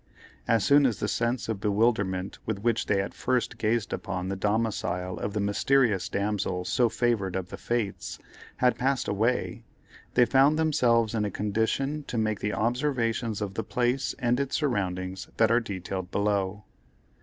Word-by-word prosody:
As 115 -2 +3
soon 145 -1 +5
as 120 - -2
the - - -1
sense 120 +1 -1
of 110 -3 -2
bewilderment 100 -3 0
with 110 -2 -1
which 115 +2 0
they 100 - +2
at 95 - -5
first 125 -1 -1
gazed 115 +1 0
upon 90 -1 -3
the 95 - -2
domicile 100 -3 -1
of 100 - -3
the 105 - -1
mysterious 105 0 +2
damsel 100 -3 -1
so 120 +2 +2
favored 110 -6 0
of 95 -1 -3
the - - -7
fates, 115 -5 -3 0.4
had 125 -2 +2
passed 135 0 +1
away, 110 +5 0 0.5
they 125 - +6
found 135 +5 +4
themselves 125 -8 +2
in 110 -2 0
a 105 - 0
condition 110 +9 -1
to 120 - -4
make 110 -2 0
the 105 - -1
observations 115 -3 0
of 100 -2 -3
the 110 - -3
place 125 +2 0
and 125 -1 +1
its 140 -1 -1
surroundings 95 -9 -2
that 110 0 +4
are 115 - +5
detailed 95 -4 -5
below. 100 0 0
110 Hz, 165 wpm, -27 LUFS, 100-125 Hz, 0.5 s, they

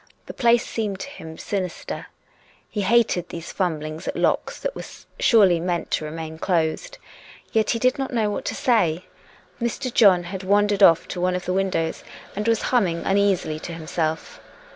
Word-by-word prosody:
The - - -8
place 235 0 +3
seemed 210 -4 -3
to 275 - -6
him 160 - -10
sinister. 185 -4 -4 0.6
He 210 - -2
hated 200 -4 +2
these 170 0 -7
fumblings 155 -4 -3
at - - -2
locks - - 0
that - - -3
were - - -5 0.4
surely 195 -7 +5
meant 175 0 -2
to 155 - 0
remain 160 +1 -6
closed. 180 - -1 0.5
Yet 220 -1 +1
he 235 - +2
did 255 +4 +1
not 270 - -2
know 220 -4 +1
what - - -4
to - - -2
say. 185 -8 +1 0.6
Mr. 240 +2 -2
John 190 -6 +6
had 185 +2 -6
wandered 205 +1 +2
off 165 -4 +6
to 180 - -4
one 180 0 +1
of 180 - -4
the 180 - -1
windows 185 -4 -1 0.3
and 210 +2 -2
was 230 -2 +2
humming 180 -9 +1
un 195 +1 +3
easily 190 -6 +1
to 170 - -7
himself. 160 -1 -3
190 Hz, 180 wpm, -23 LUFS, 165-225 Hz, 0.6 s, John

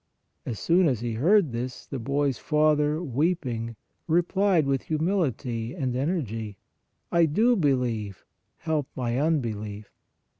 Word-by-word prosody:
As 115 - -3
soon 175 - +3
as 125 -6 0
he 120 -1 -2
heard 165 - +3
this, 125 +2 -5
the 135 - -5
boy 140 +4 0
s 125 - -4
father 150 +1 +2
weeping 130 -6 -1 0.3
replied 175 0 +2
with 135 -1 +1
humility 145 - -1
and 130 -6 -2
energy: 115 - -2 0.3
" - - -49
I 170 -1 +4
do 225 +11 +3
believe, 125 - -1 0.3
help 155 -4 -1
my 120 -1 -1
unbelief." 110 -9 -2
140 Hz, 135 wpm, -26 LUFS, 115-165 Hz, 0.3 s, I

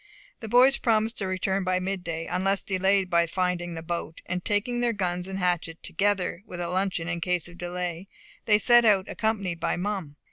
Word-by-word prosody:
The 220 - -7
boys 255 +4 +6
promised 225 -1 +1
to 195 - -2
return 190 +1 -1
by 185 0 +1
midday, 175 -4 -3
unless 195 +1 0
delayed 190 0 +1
by 170 -1 +2
finding 175 -1 -1
the 165 - -6
boat; 170 -1 -4
and 180 0 -3
taking 220 +4 0
their 240 -1 +1
guns 180 -3 -2
and 190 0 -4
hatchet, 175 -3 -1
together 195 -1 0
with 180 - -7
a 175 -1 -2
luncheon 185 -2 -1
in 175 -1 -3
case 180 -1 0
of 175 0 -14
delay, 175 0 -4 0.4
they 210 -1 +5
set 240 +3 +6
out, 200 -4 +4
accompanied 200 -6 -2
by - - 0
Mum. 185 -6 -3
185 Hz, 190 wpm, -26 LUFS, 175-205 Hz, 0.4 s, boys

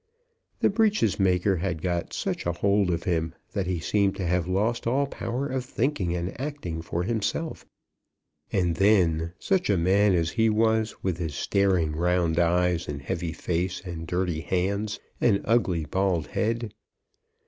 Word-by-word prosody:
The - - +4
breeches 210 - +2
maker 95 0 +2
had 85 -2 -3
got 85 -2 -1
such - - -3
a 85 - +1
hold 100 +2 +2
of 85 -1 -1
him 85 -4 -1 0.2
that 100 -4 -2
he 90 -2 -1
seemed 100 +4 +1
to 95 - -3
have 90 0 0
lost 110 +6 0
all 135 +4 +2
power 125 -1 -3
of 130 -2 -2
thinking 120 - -1
and 90 +7 -4
acting 135 - -4
for 85 +1 -2
himself. 120 - -2 0.8
And 85 -3 +1
then 85 -5 +3
such 190 - 0
a 100 - +3
man 95 +3 +3
as 85 -1 +1
he 110 -1 +2
was, 110 0 +1
with 90 -3 -1
his 80 -4 -3
staring 90 -5 +1
round 85 0 +1
eyes, 90 0 +2
and 75 -1 -4
heavy 80 +4 -3
face, 90 +3 -2
and 80 -2 -6
dirty 90 -1 -1
hands, 100 +5 -1 0.2
and 105 -5 +3
ugly 95 -8 +2
bald 90 0 0
head! 115 -1 -1
95 Hz, 160 wpm, -26 LUFS, 85-110 Hz, 0.8 s, The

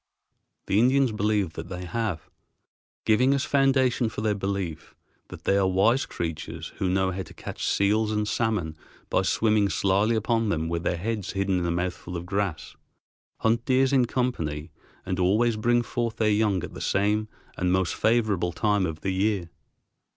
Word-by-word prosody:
The 100 - +2
Indians 130 +1 +4
believe 105 -4 0
that 80 +2 -7
they 90 -1 -6
have, 95 -4 -3 0.8
giving 125 +5 +4
as 140 - -1
foundation 130 -3 +2
for 105 - -6
their 110 -1 +1
belief 95 -5 -4 0.3
that - - -11
they 100 - +2
are 95 -1 +3
wise 100 +8 +2
creatures 80 -2 -5
who 95 - 0
know 95 0 +1
how 95 +1 -4
to 90 - -10
catch - - -5
seals 105 +2 +2
and 105 -1 0
salmon 105 -10 -1 0.4
by - - +3
swimming 105 -2 +2
slyly 100 +5 +2
upon 115 0 +1
them 80 -3 -1
with 85 0 -2
their 85 - -1
heads 105 +1 -3
hidden 95 -1 0
in 85 - -1
a - - 0
mouthful 90 0 -3
of 85 - -6
grass, 95 -3 -3 0.7
hunt 115 +1 +2
deer 130 -1 +3
in 130 -3 +4
company, 85 - -2 0.3
and 95 0 -2
always 110 +6 +3
bring 120 +2 +2
forth 120 -1 -2
their 110 -1 +2
young 105 -4 +1
at - - -7
the - - -8
same 105 +2 +1 0.3
and 90 -1 0
most 95 -1 +1
favorable 110 -6 +1
time 105 +1 +1
of 80 -1 -6
the 95 - -1
year. 95 -3 0
100 Hz, 175 wpm, -26 LUFS, 90-115 Hz, 0.8 s, Indians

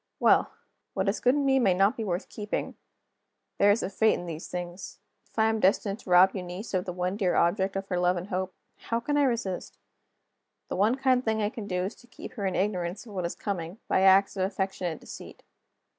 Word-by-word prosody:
Well! - - +4 0.5
what 190 +1 0
is 195 - +1
good 250 +2 +3
in 285 -1 +1
me 270 -1 +4
may 195 -7 +3
not 195 +6 +3
be 230 - -4
worth 180 -2 -2
keeping. 210 -1 -4 0.9
There 200 - +6
is 205 +3 +3
a - - -2
fate 220 +2 +3
in 175 - -6
these 165 -1 -6
things. 175 +1 -6 0.3
If - - -31
I 220 - +4
am 220 0 +1
destined 200 +1 +2
to - - -12
rob 180 +2 +7
Eunice 185 +3 -6
of 185 -1 0
the 180 - -3
one 180 +2 -2
dear 190 -4 +1
object 190 +3 +2
of 195 0 -3
her 180 -2 0
love 180 0 +2
and 180 +3 -6
hope 185 0 -3 0.2
how 230 - -2
can 290 +5 -2
I 290 - +4
resist? 225 -8 -2 0.9
The - - -2
one 210 +6 +3
kind 260 -2 +2
thing 220 -2 0
I 210 -1 +1
can 220 -4 -7
do 180 -1 -1
is 195 +4 -3
to 245 - -19
keep 245 - -10
her 205 -5 -2
in 190 - -2
ignorance 185 0 -1
of 215 - -11
what 180 -3 -1
is - - -6
coming, 180 -2 -4
by - - +2
acts 195 +1 +5
of 190 - 0
affectionate 190 -3 -2
deceit. - - -11
195 Hz, 230 wpm, -28 LUFS, 180-220 Hz, 0.9 s, rob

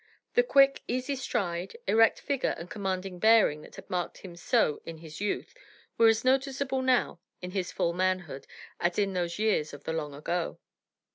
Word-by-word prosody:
The 485 - +5
quick, 275 - +4
easy 255 +3 -1
stride, 195 - -3
erect 225 0 +4
figure 275 -2 -1
and 170 - -8
commanding 190 -2 -3
bearing 220 -8 +5
that - - -14
had - - -11
marked 180 -1 -3
him 180 -3 -10
so 175 -3 +1
in 165 -1 -8
his 160 +2 -10
youth 205 - -2 0.4
were 230 - +5
as 225 +1 +3
noticeable 265 0 +1
now, 255 -9 +1 0.2
in 180 0 -7
his 185 -2 -2
full 170 - 0
manhood, 185 -6 -1 0.3
as 175 0 0
in 200 -2 +1
those 175 -2 -2
years 210 -9 0
of 145 - -14
the 160 - -3
long 150 -3 -4
ago. 170 +4 -3
190 Hz, 180 wpm, -29 LUFS, 170-240 Hz, 0.4 s, The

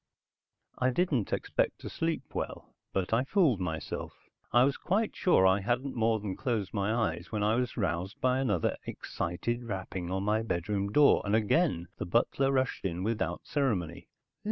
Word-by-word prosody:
I 130 - +3
didn't 130 - 0
expect - - 0
to - - -6
sleep 165 0 -1
well, - - -5 0.2
but 95 +2 -1
I 115 +3 +3
fooled 140 - +3
myself. 80 -4 -4 0.4
I 120 +2 +6
was 140 +1 +2
quite 205 +4 0
sure 175 - +4
I 95 +1 +5
hadn't 125 +6 -1
more 115 -1 +2
than 100 -2 -4
closed 110 -7 -2
my 100 0 0
eyes 115 -1 -1
when 105 -2 -1
I 105 +1 +3
was 125 +1 -1
roused 90 -2 -2
by 130 +1 +2
another 105 -11 +1
excited 120 +8 -3
rapping 95 -4 -4
on 95 +1 -1
my 105 +2 +2
bedroom 100 0 -1
door 145 +4 +6
and 105 +1 +1
again 110 - +2
the - - -4
butler 130 +6 +2
rushed 130 -1 0
in 90 -1 -2
without 95 -5 -2
ceremony. 100 - -1
110 Hz, 170 wpm, -30 LUFS, 95-130 Hz, 0.4 s, I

